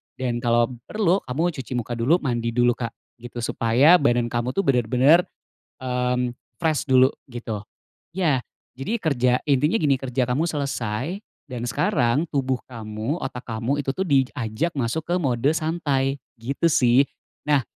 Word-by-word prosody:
Dan 125 -2 -2
kalau 120 0 +2 0.2
perlu 195 -4 +2
kamu 160 +8 0
cuci 130 -1 -8
muka 120 0 -3
dulu, 145 +10 +2
mandi 120 -4 -1
dulu, 120 0 +4
Kak, 115 -2 -4 0.2
gitu. 120 0 -8
Supaya 120 +9 +4
badan 120 -6 +1
kamu 120 +2 -2
tuh 195 - +1
benar-benar, 130 - +4 0.6
mmm, 125 -1 -1 0.3
fresh 160 -3 +1
dulu 130 -1 +6 0.2
gitu. 115 -4 -5 0.5
Ya, 165 -8 +2 0.4
jadi 215 +13 -1
kerja 125 -6 +2 0.2
intinya 145 - +3
gini, 140 -3 +3
kerja 130 0 -2
kamu 155 +7 +1
selesai, 140 - -2 0.3
dan 120 -1 -4
sekarang 135 - +1
tubuh 130 -3 -1
kamu, 110 +6 -4
otak 125 -2 -5
kamu 120 +6 -1
itu 135 - -2
tuh 190 +6 -2
diajak 135 0 0
masuk 130 +6 -1
ke 180 - +2
mode 135 -3 +1
santai 145 -4 -1 0.2
gitu 140 +8 0
sih. 125 -1 +4 0.4
Nah, 145 -4 +3
130 Hz, 150 wpm, -23 LUFS, 120-150 Hz, 0.6 s, dulu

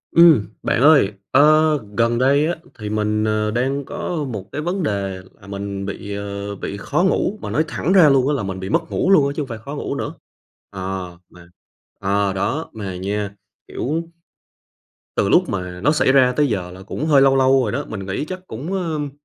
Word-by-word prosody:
Ừm, 165 -10 +7 0.2
bạn 115 - +1
ơi, 145 -9 +6 0.2
ơ, 155 +2 +5 0.2
gần 115 0 +2
đây 140 +4 +3
á 175 - -1 0.2
thì 105 -1 -5
mình, 105 0 0
ờ, 110 0 0
đang 130 +4 -1
có 165 -4 -3
một 105 -4 -6
cái 150 - -3
vấn 180 +4 -2
đề 100 -6 -2 0.2
là 100 - -14
mình 100 0 -5
bị, 100 +1 -5
ờ, 100 0 -5
bị 100 +1 -5
khó 135 - 0
ngủ, 190 +2 +1
mà - - -5
nói 155 - +2
thẳng 165 +4 -1
ra 175 -6 +7
luôn 135 -1 +3
á 150 - +2
là 135 -7 -1
mình 95 -1 -4
bị 95 0 -5
mất 165 +6 0
ngủ 190 - +1
luôn 150 -8 +5
á 140 - -3
chứ 155 - -2
hông 140 - -4
phải 115 -3 -6
khó 140 +7 -8
ngủ - - -3
nữa. - - -4 0.6
Ờ, 95 -2 -5
mà 90 -1 -16 0.5
ờ, 100 0 0
đó 110 +12 -2
mà 100 -4 -5
nha, 100 +2 -3 0.4
kiểu, 160 +6 -2 1.1
từ - - +2
lúc - - +4
mà 90 -1 -4
nó 145 +10 +3
xảy 150 -4 +3
ra 130 -2 +5
tới 150 - +3
giờ 95 -6 -2
là 90 +1 -11
cũng 130 +9 -4
hơi 145 -4 +5
lâu 135 0 +5
lâu 135 0 +4
rồi 110 - -2
đó, 140 +4 -2
mình 100 -3 -6
nghĩ 95 +9 -2
chắc 185 +3 -8
cũng 140 +9 -6
ờm, 160 -6 -2
120 Hz, 215 wpm, -20 LUFS, 100-150 Hz, 1.1 s, Ừm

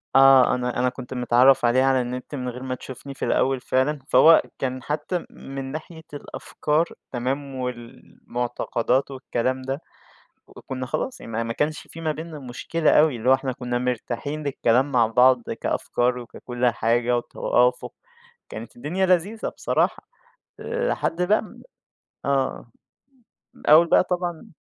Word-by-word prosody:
آه، 135 -1 +7
أنا 125 -1 -2
أنا 125 0 +2
كُنت 125 0 -9
متعرّف 125 +1 +4
عليها 130 +3 +4
على 130 -1 +3
النِّت، 125 +3 -5
من 125 -2 -3
غير 125 +1 -8
ما 130 -1 -3
تشوفني 130 +2 -9
في 130 - -4
الأول 135 -1 +1
فعلًا، 130 +4 0
فهو 165 +1 +7 0.2
كان 130 -1 -3
حتى 150 +5 -2
م - - -12 0.3
من 135 -1 -5
ناحية 160 +1 -8
الأفكار 150 +2 -2 0.3
تمام، 135 +2 -3
والمُعتقدات 125 +1 -3
والكلام 130 -1 -2
ده، 135 +3 -4 0.7
وكُنّا 130 -1 -7
خلاص 255 - -3
يعني - - -9
ما 115 +1 -1
ما 115 0 -3
كانش 150 +3 -2
في 165 - -10
ما 160 -1 0
بينّا 160 0 -7
مُشكلة 145 +5 -1
أوي، 150 -3 +4
اللي 120 +2 -1
هو - - +8
إحنا 135 0 0
كُنّا 125 -1 -3
مرتاحين 125 +4 -3
للكلام 135 -1 +1
مع 120 -4 +4
بعض 125 +2 +4 0.2
كأفكار 125 +1 0
وككُلّ 120 +1 -5
حاجة 120 +2 +1
وتوافق، 125 +1 0 0.6
كانت - - -9
الدنيا 190 -2 -1
لذيذة 190 +5 +1
بصراحة، - - -1 0.5
لحد 480 - -2
لمّا 200 +4 0 0.6
آه، 135 -3 0 0.9
م - - -19
من - - -13
أول 165 +3 +7
بقى - - +5
طبعًا 175 -2 -3
130 Hz, 150 wpm, -24 LUFS, 125-150 Hz, 0.9 s, هو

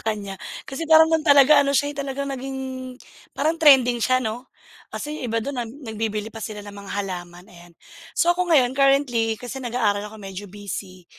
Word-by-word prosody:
kanya. 205 -3 -4 0.2
Kasi 310 +4 -6
parang 320 0 +7
'nun 320 - +3
talaga 285 +1 +7
ano 280 -1 +1
siya, 290 0 +1
eh, - - -18
talagang 275 0 -3
naging 265 +1 -5 0.8
parang 320 +3 0
trending 255 -5 +6
siya, 255 +2 +2
'no? 235 +4 -5 0.4
Kasi 300 +1 -5
yung - - -6
iba 230 - +1
dun 280 -1 -4
na - - -2
nagbibili 220 -4 -4
pa 225 - -9
sila 210 -1 -6
ng 205 - -9
mga 200 -1 -10
halaman, 180 -2 -7
ayan. 175 -2 -16 0.4
So, 345 +1 +4
ako 360 -1 -1
ngayon 255 -4 +4
currently, 265 -5 +2
kasi 250 +2 -7
nag-aaral 225 -5 0
ako 220 - -12
medyo 195 0 -7
busy, 195 -3 -7
245 Hz, 190 wpm, -23 LUFS, 205-280 Hz, 0.8 s, parang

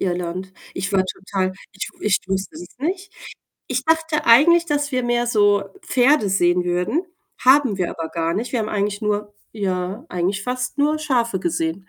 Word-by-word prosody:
Irland. 180 +1 -3 0.2
Ich 195 +2 -3
war 190 -1 +3
total, 190 0 -3 0.2
ich 195 - -5
w - - -10
ich 200 - +3
wusste 195 +11 -3
es 350 - -8
nicht. 370 +7 -3 0.6
Ich - - -1
dachte 320 -1 +1
eigentlich, 335 +8 +6
dass 290 -2 -1
wir 255 -1 +1
mehr 240 0 +1
so 205 -3 +3 0.2
Pferde 255 -4 +3
sehen 175 -1 +2
würden, 180 - 0 0.4
haben 260 -5 +4
wir 180 - 0
aber 165 -1 -5
gar 165 0 -1
nicht. 230 +6 -3
Wir 240 - +1
haben 215 - -2
eigentlich 205 0 -1
nur 210 0 -2 0.2
ja, 190 -2 -3
eigentlich 185 +3 -1
fast 255 +2 -3
nur 300 +2 +2
Schafe 235 -10 0
gesehen. 165 +2 -2
205 Hz, 175 wpm, -21 LUFS, 185-260 Hz, 0.6 s, eigentlich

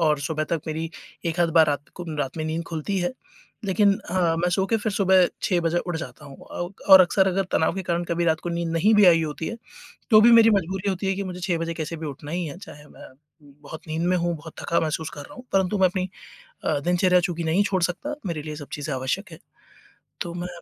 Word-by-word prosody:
और 155 -3 +3
सुबह 155 +1 -2
तक 165 -2 0
मेरी 160 +1 -3 0.4
एक-आध 170 0 +1
बार 160 -2 +6
रात 145 -1 -2
को 175 - -7
रात 135 +1 -3
में 155 - -3
नींद 160 +2 -2
खुलती 165 +5 -3
है। 175 +6 -1 0.5
लेकिन 200 +1 +3 0.2
अ, - - -3 0.2
मैं 175 +1 +1
सो 190 +2 +1
के 225 - +1
फिर 210 0 -2
सुबह 190 -2 +4 0.2
6:00 180 -2 +1
बजे 170 +1 +1
उठ 175 -2 -3
जाता 160 -2 -8
हूँ 140 -1 -11
अ, 175 - -4 0.2
और 190 - +12
अक्सर 190 +1 +3
अगर 190 +1 0
तनाव 160 - +2
के 190 - -3
कारण 175 -1 -1
कभी 170 0 -1
रात 160 -1 +1
को 175 - -5
नींद 170 0 -2
नहीं 200 +7 +3
भी 210 -1 +6
आई 165 -2 +6
होती 155 +1 -4
है, 230 - -5 0.6
तो 215 0 +8
भी 235 +2 +7
मेरी 230 -1 +8
मजबूरी 190 0 0
होती 190 +1 -2
है 195 - +2
कि 200 - -3
मुझे 180 -1 -6
6:00 175 -2 -1
बजे 165 0 -3
कैसे 160 +1 -4
भी 160 - -6
उठना 145 +1 -8
ही 175 0 -2
है। 150 - -7
चाहे 150 -6 -12
मैं, - - -14 0.5
बहुत 155 +2 -10
नींद 160 +2 -2
में 180 0 +2
हूँ, 170 0 -1
बहुत 160 +1 -11
थका 170 - +1
महसूस 160 0 -2
कर 145 - -7
रहा - - -12
हूँ, 250 - -10
परंतु 195 +1 +2
मैं 185 - +6
अपनी 185 0 -3 0.6
अ, 145 - +1
दिनचर्या 180 +3 +3
चूँकि 175 -1 -2
नहीं 165 +5 +2
छोड़ 190 -3 0
सकता, 275 - -2
मेरे 160 -3 -3
लिए 155 -1 -6
सब 145 -2 -9
चीज़ें 145 -1 -4
आवश्यक 170 +10 -3
है, 160 - -11 0.8
तो 170 0 -4
मैं 175 0 -4
170 Hz, 245 wpm, -24 LUFS, 160-190 Hz, 0.8 s, और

